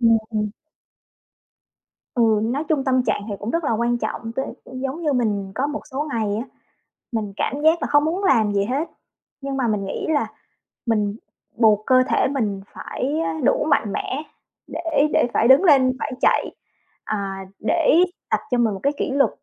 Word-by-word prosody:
Ừm, 230 Hz, -1 st, +5 dB
ừm. 210 Hz, -2 st, -1 dB, 1.6 s
Ừ, 240 Hz, -, +2 dB, 0.2 s
nói 265 Hz, +7 st, -1 dB
chung 295 Hz, -4 st, +1 dB
tâm 260 Hz, -1 st, +2 dB
trạng -, -, 0 dB
thì 205 Hz, -, -3 dB
cũng 210 Hz, -, -4 dB
rất 335 Hz, +2 st, -1 dB
là 280 Hz, -, +1 dB
quan 235 Hz, +2 st, +1 dB
trọng. 225 Hz, -1 st, -4 dB
T -, -, -10 dB, 0.3 s
giống 265 Hz, +4 st, -4 dB
như 300 Hz, -3 st, +1 dB
mình 205 Hz, -6 st, -1 dB
có 270 Hz, -, 0 dB
một 295 Hz, 0 st, -4 dB
số 290 Hz, +4 st, -3 dB
ngày 215 Hz, -3 st, 0 dB
á, 225 Hz, -, -3 dB, 0.7 s
mình 215 Hz, -3 st, -2 dB
cảm 280 Hz, -, -1 dB
giác 325 Hz, +2 st, +4 dB
là -, -, +1 dB
không 290 Hz, 0 st, +5 dB
muốn 350 Hz, +6 st, -1 dB
làm 220 Hz, -, +3 dB
gì 200 Hz, -1 st, +1 dB
hết. 270 Hz, +9 st, -1 dB, 0.5 s
Nhưng 275 Hz, 0 st, -4 dB
mà 255 Hz, -3 st, 0 dB
mình 210 Hz, -2 st, 0 dB
nghĩ -, -, -4 dB
là 300 Hz, -2 st, +2 dB, 0.6 s
mình 210 Hz, -3 st, +1 dB, 0.4 s
buộc 215 Hz, -2 st, +4 dB
cơ 255 Hz, 0 st, +5 dB
thể -, -, +2 dB
mình 220 Hz, -8 st, -1 dB
phải 285 Hz, +5 st, -3 dB
á, 320 Hz, -1 st, -2 dB
đủ -, -, +3 dB
mạnh 225 Hz, -8 st, +2 dB
mẽ 290 Hz, +4 st, -3 dB, 0.4 s
để 315 Hz, -3 st, +1 dB
để -, -, +3 dB
phải 230 Hz, -, +3 dB
đứng 265 Hz, +8 st, +7 dB
lên 270 Hz, -7 st, +5 dB
phải -, -, -3 dB
chạy, -, -, +2 dB, 0.5 s
à, 195 Hz, -2 st, -4 dB
để 330 Hz, +6 st, +4 dB, 0.3 s
tập -, -, +2 dB
cho 245 Hz, -, +2 dB
mình 230 Hz, -3 st, +2 dB
một 195 Hz, -, -6 dB
cái 280 Hz, +1 st, +2 dB
kỷ -, -, -1 dB
luật, 275 Hz, 0 st, +3 dB
255 Hz, 190 wpm, -22 LUFS, 215-290 Hz, 1.6 s, đứng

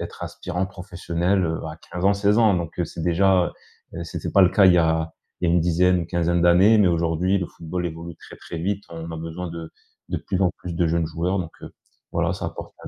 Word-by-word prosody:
être -, -, -7 dB
aspirants 90 Hz, +2 st, -3 dB
professionnels, 90 Hz, 0 st, -1 dB
heu, 80 Hz, 0 st, -2 dB
à 75 Hz, 0 st, -7 dB
15 90 Hz, 0 st, -4 dB
ans, 100 Hz, -, +5 dB
16 100 Hz, +1 st, +2 dB
ans. 110 Hz, -3 st, +5 dB
Donc, 85 Hz, -2 st, -4 dB
heu, 90 Hz, -, +1 dB
c'est 80 Hz, -, -7 dB
déjà, 90 Hz, +1 st, +3 dB, 0.5 s
heu 85 Hz, 0 st, -5 dB
c’était -, -, -5 dB
pas 100 Hz, -, +5 dB
le 90 Hz, -, +5 dB
cas 100 Hz, -1 st, +5 dB
il 90 Hz, -, +6 dB
y -, -, +5 dB
a 80 Hz, -1 st, +1 dB, 0.3 s
il 90 Hz, -, +1 dB
y -, -, +3 dB
a -, -, +3 dB
une 85 Hz, -, +4 dB
dizaine, 90 Hz, +2 st, +3 dB
une 85 Hz, -, -4 dB
quinzaine 85 Hz, 0 st, +1 dB
d'années. 90 Hz, +6 st, +6 dB
Mais 100 Hz, -3 st, +5 dB
aujourd'hui 85 Hz, +3 st, +1 dB
le 90 Hz, -, -2 dB
football 90 Hz, +2 st, -5 dB
évolue 85 Hz, +1 st, -7 dB
très, -, -, -13 dB
très 85 Hz, -, -8 dB
vite. 100 Hz, +4 st, -2 dB
On 85 Hz, 0 st, -7 dB
a 80 Hz, -, -5 dB
besoin 80 Hz, +2 st, -5 dB
de 85 Hz, -1 st, -7 dB, 0.4 s
de -, -, -1 dB
plus 95 Hz, -, -3 dB
en 90 Hz, -, +3 dB
plus 90 Hz, -2 st, -6 dB
de 85 Hz, 0 st, +1 dB
jeunes 85 Hz, 0 st, +1 dB
joueurs 85 Hz, +4 st, -1 dB
donc, 85 Hz, -3 st, -4 dB
heu, -, -, -9 dB, 0.4 s
voilà -, -, +1 dB
ça -, -, -6 dB
apporte -, -, -8 dB
85 Hz, 245 wpm, -23 LUFS, 85-95 Hz, 0.5 s, il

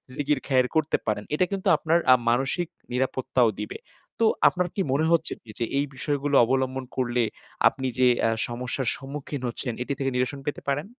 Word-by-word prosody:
জিকির 145 Hz, -1 st, 0 dB
খায়ের 130 Hz, -2 st, +3 dB
করতে 160 Hz, -1 st, +2 dB
পারেন। 105 Hz, -1 st, 0 dB
এটা 180 Hz, -, +3 dB
কিন্তু 195 Hz, 0 st, -3 dB
আপনার 165 Hz, +2 st, +2 dB
আ -, -, +8 dB
মানসিক 135 Hz, +8 st, +1 dB, 0.2 s
নিরাপত্তাও 125 Hz, -2 st, +1 dB
দিবে। 105 Hz, -, -6 dB, 0.4 s
তো -, -, +5 dB, 0.2 s
আপনার 180 Hz, -1 st, +1 dB
কি 200 Hz, -, 0 dB
মনে 145 Hz, +4 st, +2 dB
হচ্ছে 165 Hz, -1 st, +3 dB
কি 110 Hz, -, -20 dB
যে 115 Hz, -, +1 dB
এই 140 Hz, -, +2 dB
বিষয়গুলো 145 Hz, 0 st, -1 dB
অবলম্বন 130 Hz, +1 st, -1 dB
করলে 125 Hz, -2 st, +1 dB, 0.4 s
আপনি 130 Hz, 0 st, -1 dB
যে 125 Hz, -, +6 dB, 0.2 s
আ -, -, +3 dB, 0.2 s
সমস্যার 125 Hz, +1 st, -3 dB
সম্মুখীন 140 Hz, 0 st, -6 dB
হচ্ছেন 120 Hz, +1 st, -3 dB
এটি 140 Hz, -, -3 dB
থেকে 135 Hz, -1 st, 0 dB
নিরসন 125 Hz, +2 st, -1 dB
পেতে 145 Hz, -, -3 dB
পারেন? 140 Hz, +2 st, 0 dB
135 Hz, 180 wpm, -25 LUFS, 125-145 Hz, 0.4 s, আ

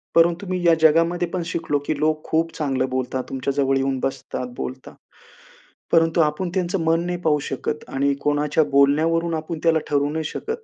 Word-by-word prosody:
परंतु 170 Hz, +3 st, +3 dB
मी 185 Hz, -1 st, -1 dB
या 170 Hz, -, +6 dB
जगामध्ये 165 Hz, +3 st, +3 dB
पण 180 Hz, +1 st, -3 dB
शिकलो, 165 Hz, -3 st, -1 dB
की 155 Hz, -, 0 dB
लोक 155 Hz, 0 st, 0 dB
खूप 165 Hz, +1 st, 0 dB
चांगलं 135 Hz, -4 st, -1 dB
बोलतात, 130 Hz, 0 st, -2 dB
तुमच्या 135 Hz, +1 st, -2 dB
जवळ 135 Hz, -1 st, +1 dB
येऊन 135 Hz, 0 st, 0 dB
बसतात, 135 Hz, -1 st, -3 dB
बोलतात, 130 Hz, 0 st, -6 dB, 1.0 s
परंतु 165 Hz, 0 st, +4 dB
आपण 155 Hz, +4 st, 0 dB
त्यांचं 185 Hz, 0 st, 0 dB
मन 165 Hz, +1 st, +1 dB
नाही 180 Hz, 0 st, -2 dB
पाहू 155 Hz, -3 st, +2 dB
शकत 150 Hz, +3 st, -3 dB
आणि 140 Hz, +1 st, +1 dB
कोणाच्या 145 Hz, +1 st, +2 dB
बोलण्यावरून 160 Hz, +5 st, +3 dB
आपण 160 Hz, +1 st, -5 dB
त्याला 165 Hz, -1 st, +4 dB
ठरवू 145 Hz, 0 st, +1 dB
नाही 160 Hz, +1 st, -2 dB
शकत. 450 Hz, -, -5 dB
155 Hz, 175 wpm, -22 LUFS, 140-165 Hz, 1.0 s, या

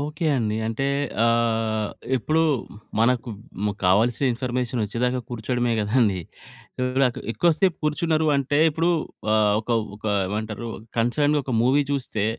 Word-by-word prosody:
Okay 150 Hz, +3 st, -3 dB
అండి. 110 Hz, -3 st, -1 dB
అంటే 115 Hz, +4 st, -2 dB, 0.4 s
ఆహ్, 115 Hz, -2 st, +1 dB, 0.3 s
ఇప్పుడు 155 Hz, +6 st, +1 dB, 0.6 s
మనకు 120 Hz, +1 st, +2 dB, 0.4 s
ము 105 Hz, -, 0 dB
కావాల్సిన 110 Hz, +8 st, +3 dB
ఇన్ఫర్మేషన్ 125 Hz, 0 st, -2 dB
వచ్చేదాకా 125 Hz, +4 st, -1 dB
కూర్చోడమే 120 Hz, +1 st, -1 dB
గదండీ. 105 Hz, -3 st, +2 dB, 0.6 s
ఇప్పుడు 125 Hz, +1 st, 0 dB
నాకు 125 Hz, -2 st, 0 dB
ఎక్కువ 170 Hz, +10 st, +3 dB
సేపు 185 Hz, 0 st, +2 dB
కూర్చున్నారు 155 Hz, +1 st, +1 dB
అంటే 140 Hz, +1 st, 0 dB
ఇప్పుడు 165 Hz, +3 st, +1 dB, 0.4 s
ఆహ్, 105 Hz, -1 st, +3 dB
ఒక, 110 Hz, -, -18 dB, 0.3 s
ఒక 105 Hz, -, -23 dB, 0.2 s
ఏమంటారు 110 Hz, +3 st, -4 dB, 0.3 s
కన్సర్డ్‌గా 145 Hz, +6 st, +2 dB
ఒక 130 Hz, -, -4 dB
మూవీ 135 Hz, +4 st, +3 dB
చూస్తే 130 Hz, -7 st, -1 dB
120 Hz, 130 wpm, -24 LUFS, 110-140 Hz, 0.6 s, కావాల్సిన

